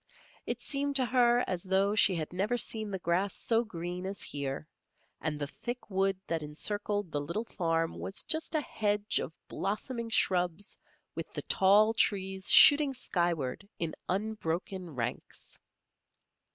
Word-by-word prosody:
It - - -2
seemed 280 0 -1
to 260 -2 +3
her 245 -1 +3
as 180 -2 -2
though 195 +2 +1
she 205 -3 +5
had 160 0 -4
never 205 +7 0
seen 220 -2 -1
the 195 - -3
grass 180 +2 0
so 230 0 +1
green 180 -3 -6
as 195 -2 -3
here, 140 +1 -4 0.5
and 150 -2 -2
the 145 - -2
thick 240 - -7
wood 195 0 +1
that 165 -1 -2
encircled 205 +5 -2
the 145 - -2
little 170 +10 -3
farm 165 -5 -1
was 195 - -3
just 315 0 -1
a 310 - +2
hedge 210 -5 -1
of - - -4 0.2
blossoming 230 +4 -4
shrubs 180 -2 +1 0.4
with - - -6
the - - -5
tall 205 +3 +4
trees 190 -3 +1
shooting 290 -2 +9
skyward 175 - -2
in 165 -2 -3 0.2
unbroken 190 -2 -3
ranks. 120 0 -5
195 Hz, 150 wpm, -30 LUFS, 170-220 Hz, 0.5 s, shooting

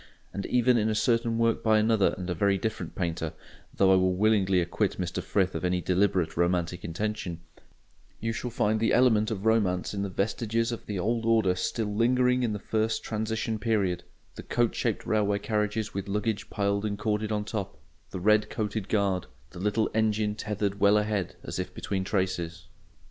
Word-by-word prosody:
And 100 - -4
even 125 0 +3
in 110 0 +1
a 110 - 0
certain 115 +1 +1
work 115 0 +2
by 110 -1 +4
another 110 -1 +3
and 90 -1 -5
a 90 - -1
very 100 +3 +2
different 110 +3 -4
painter—though 85 +2 -1
I - - +6
willingly 95 +1 +3
acquit 90 +4 -1
Mr 90 0 -2
Frith 95 0 0
of - - -4
any 90 0 +1
deliberate 90 -2 +1
romantic 85 +1 0
intention—you 90 +3 -6
shall 125 - -4
find 110 -2 +1
the 115 - +2
element 110 -4 +4
of 105 -2 -4
romance 105 -6 +1
in 100 - -2
the 100 - -2
vestiges 115 +4 -1
of 115 - -6
the 105 - -3
old 115 +5 0
order 110 -5 +3
still 105 +3 -2
lingering 125 +3 +3
in 120 -3 0
the - - -2
first 110 +1 -1
transition 110 0 -2
period: 100 -5 0 0.3
the - - -8
coach 120 -1 0
shaped - - -1
railway 105 -2 +1
carriages 105 +1 -1
with 100 0 -4
luggage 105 +1 -2
piled 100 0 0
and 105 -1 -2
corded 105 +1 -1
on 105 -1 -1
top, 105 -2 -4 0.3
the 95 - -5
red 105 +2 +3
coated 105 -2 -3
guard, 100 -4 +1 0.2
the 90 - -10
little 105 +3 +1
engine 110 -1 +1
tethered 105 -1 -3
well 100 +1 +5
ahead 105 -3 -1
as - - -5
if - - -5
between 95 -1 -2
traces. 90 -3 -2
105 Hz, 180 wpm, -28 LUFS, 95-110 Hz, 0.3 s, I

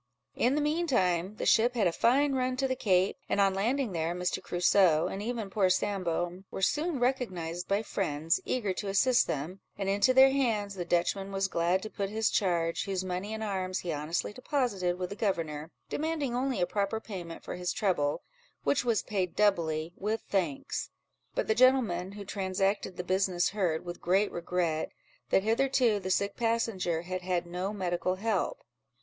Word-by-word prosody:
In 255 +3 +2
the 300 - +1
mean 315 +4 0
time, 185 - +1
the - - -4
ship 240 +2 +4
had 220 -4 +2
a 175 - +3
fine 275 +9 +3
run 255 -1 0
to 270 0 +1
the 260 - -1
Cape; 190 -5 +2
and - - +1
on 195 -1 +4
landing 235 +5 0
there, 165 0 -1
Mr. 180 0 -1
Crusoe, 175 -2 +3
and 195 - -4
even 220 -3 -3
poor 195 -3 +3
Sambo, 180 -2 -1
were 190 - -5
soon 305 - +1
recognised 185 -10 -1
by 200 +2 +1
friends, 165 -6 -1
eager 210 -7 -1
to 200 - -5
assist 235 +6 +3
them; 160 +7 -3 0.2
and 195 - -3
into 205 +6 +3
their 265 +1 +7
hands 225 -7 0
the 180 -3 -4
Dutchman 195 +3 0
was 195 0 0
glad 175 +1 +1
to 215 - -5
put 200 -2 -3
his 220 +1 +1
charge, 170 -4 +1
whose 190 -2 -2
money 185 +3 -3
and 220 0 -4
arms 185 -3 -2
he 175 - -3
honestly 155 +7 -2
deposited 230 - -1
with 180 0 -4
the - - -4
governor, 165 -7 -2 0.2
demanding 300 -5 -2
only 260 +1 0
a 175 - +3
proper 200 +4 -1
payment 180 -7 -8
for - - -5
his 180 0 -2
trouble, 170 -9 0 0.4
which 285 - +2
was 235 -3 +1
paid 185 -4 -2
doubly, 170 -5 +1
with 215 +3 -2
thanks; 170 -9 -2 0.5
but - - 0
the 220 - +3
gentleman 225 -7 +3
who 205 0 -8
transacted 195 0 -1
the 180 - -3
business 185 -1 +1
heard, 180 -6 -1
with 175 0 -7
great 195 +4 +2
regret, 170 -2 -1 0.4
that 190 - +3
hitherto 235 -1 +2
the 185 -1 -5
sick 200 +2 +1
passenger 225 -8 0
had 185 +1 -4
had 180 -1 -1
no 180 +3 -3
medical 185 -2 -1
help. 225 - -1
195 Hz, 185 wpm, -30 LUFS, 180-225 Hz, 0.5 s, their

